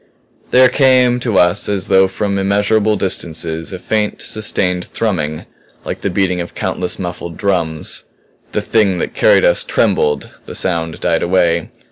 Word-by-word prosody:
There 130 0 +6
came 125 -2 +3
to 115 -5 -1
us 90 +4 +2
as 100 -2 -1
though 95 0 +4
from 100 +1 -2
immeasurable 105 +2 +1
distances, 80 -3 -1
a 95 - -5
faint, 105 +3 -1
sustained 90 -4 0
thrumming 80 -9 -2 0.4
like - - -5
the - - -1
beating 90 -1 0
of 85 - -8
countless 90 -1 -3
muffled 85 -2 -6
drums. 85 -6 -1 0.5
The - - -2
Thing 105 -5 +2
that - - -3
carried - - +4
us - - +2
trembled 75 0 0 0.2
the - - -8
sound 85 -3 -2
died 85 -2 +1
away. 85 -2 +1
95 Hz, 150 wpm, -16 LUFS, 85-105 Hz, 0.5 s, There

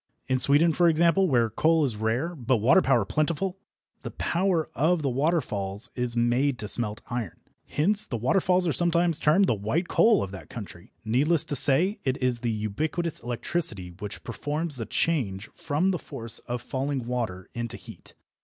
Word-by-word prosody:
In 130 0 +1
Sweden, 145 +6 +5
for 175 +1 +4
example, 170 +4 +3
where 120 -6 +2
coal 160 +6 +2
is 125 -5 -2
rare, 115 +10 -1
but 130 -5 0
water 125 - +4
power 120 - +2
plentiful, 170 - -1 0.4
the - - -6
power 175 -2 0
of 160 +2 +1
the 135 - 0
waterfalls 120 - -2
is 125 -1 -1
made 125 +3 +1
to 105 - -6
smelt 110 -1 +1
iron. 120 -8 -4 0.3
Hence 200 +8 +2
the 120 - -3
waterfalls 180 - +1
are 160 - +1
sometimes 170 -1 +1
termed 170 +7 +4
the - - +2
"white 110 - -2
coal" 225 -2 +4
of 95 - -6
that 95 - -10
country. 100 -7 -10
Needless 140 +8 +2
to 145 - -3
say, 165 - +4
it 130 0 -1
is 125 -2 0
the 120 - -2
ubiquitous 145 - -2
electricity 120 - -2
which 105 -1 -7
performs 150 +5 -3
the 115 - -5
change 115 -11 -1
from 165 +7 -1
the 180 - -2
force 115 -6 -4
of 120 0 -4
falling 135 -1 -3
water 115 -7 -4
into 120 -2 -5
heat. - - -14
135 Hz, 175 wpm, -26 LUFS, 115-170 Hz, 0.4 s, Sweden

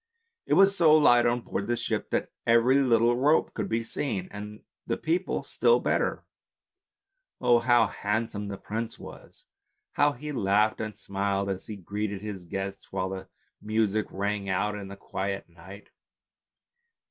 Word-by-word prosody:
It - - +3
was 195 +1 +6
so 160 -4 +6
light 120 -5 +5
on 120 0 +1
board 100 -3 -4
the 120 0 0
ship - - -2
that - - -1 0.2
every 115 +4 +5
little 120 -2 +3
rope 145 +6 +2
could - - -3
be 115 +1 0
seen, 115 -5 -3
and 105 +1 -8 0.2
the - - -1
people 175 +4 -1
still 470 - +3
better. - - -1 1.1
Oh! 120 -2 +4
how 120 0 +4
handsome 105 0 -2
the 100 -1 -5
prince 115 +3 -5
was, - - -13 0.5
how 145 0 +3
he 150 +4 -7
laughed 105 -3 +2
and 110 -1 -5
smiled 100 0 -1
as 95 -1 -6
he 110 - -5
greeted 100 +1 -4
his 100 -4 -6
guests, 95 +2 -5
while 95 -1 -2
the 95 0 -6 0.3
music 110 -1 0
rang 100 0 -2
out 100 +3 0
in 100 -2 -6
the 100 - -8
quiet 100 0 -4
night. 90 +4 -14
105 Hz, 160 wpm, -27 LUFS, 100-120 Hz, 1.1 s, was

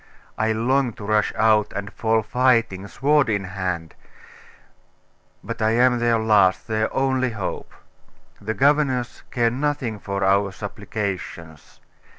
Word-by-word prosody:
I 110 0 0
long 125 +3 +1
to 105 - -10
rush 105 0 +1
out, 110 -1 +3
and 100 +1 -5
fall 110 -1 +1
fighting, 115 -4 +1
sword 145 +3 +2
in 100 -2 0
hand: 95 -4 -4 1.5
but 115 -1 -6
I 110 0 +2
am 125 +1 +3
their 120 -1 +2
last, 105 -4 +3
their 110 -1 -1
only 130 -1 +1
hope. 105 -5 -5 0.7
The 110 +2 -3
governors 135 -3 +1
care 120 -1 +1
nothing 130 -4 -2
for 100 -1 -3
our 100 +1 +2
supplications. 100 -6 -6
110 Hz, 130 wpm, -22 LUFS, 100-125 Hz, 1.5 s, out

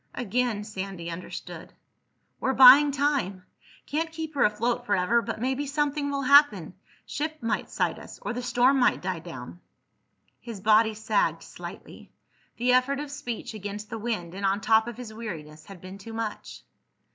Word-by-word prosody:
Again 240 -2 -1
Sandy 190 -5 -6
understood. 170 +2 -8 0.7
"We're 265 0 0
buying 270 +3 +9
time. 270 -10 -1 0.4
Can't 320 +2 -2
keep 320 -1 -6
her 280 - +2
afloat 230 +4 0
forever, 205 +4 +2
but 225 -1 -5
maybe 265 +4 -1
something 290 0 -1
will 280 -1 -2
happen. 255 - +5 0.3
Ship 310 +1 -4
might 225 -2 -1
sight - - -1
us. - - -11
Or - - -3
the 245 - -4
storm 250 +2 +3
might 245 - +2
die 185 -2 -2
down." 160 -2 -9 0.8
His 230 -4 -8
body 220 +2 +4
sagged 220 - 0
slightly. - - -11 0.5
The 250 +1 +2
effort 265 +2 +2
of 295 -1 -6
speech, 245 -4 -6
against 210 +1 -7
the 225 - -4
wind 210 -7 -3
and 195 +1 -7
on 195 +1 +2
top 220 +2 +3
of 240 -1 -6
his 240 -3 -8
weariness, 155 -9 -8
had 195 -3 -12
been 185 +2 -10
too 225 +3 -10
much. 225 -2 -6
230 Hz, 165 wpm, -26 LUFS, 200-270 Hz, 0.8 s, buying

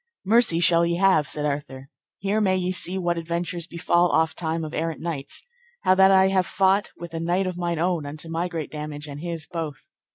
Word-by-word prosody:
Mercy 215 -5 +4
shall 170 0 +5
ye 170 0 +1
have, 180 -5 +3
said 150 +2 -2
Arthur: 140 -2 -4 0.3
here 200 +3 0
may 190 -2 +3
ye 180 0 -1
see 185 0 -3
what 175 -2 0
adventures 170 0 -3
befall 175 0 +2
ofttime 160 0 0
of 155 - -7
errant 165 0 -2
knights, 155 -5 -5 0.4
how 185 - +5
that 190 0 +6
I 190 0 +5
have 185 -2 +1
fought 195 +1 +2
with 170 -1 -9
a 165 - -3
knight 175 +3 0
of 185 -1 -3
mine 175 -1 -2
own 170 -3 0
unto 155 +3 -6
my 165 +2 -2
great 165 -4 -5
damage 150 -1 -6
and 145 0 -7
his 165 -2 -4
both. 160 -5 -6
170 Hz, 205 wpm, -24 LUFS, 160-185 Hz, 0.4 s, that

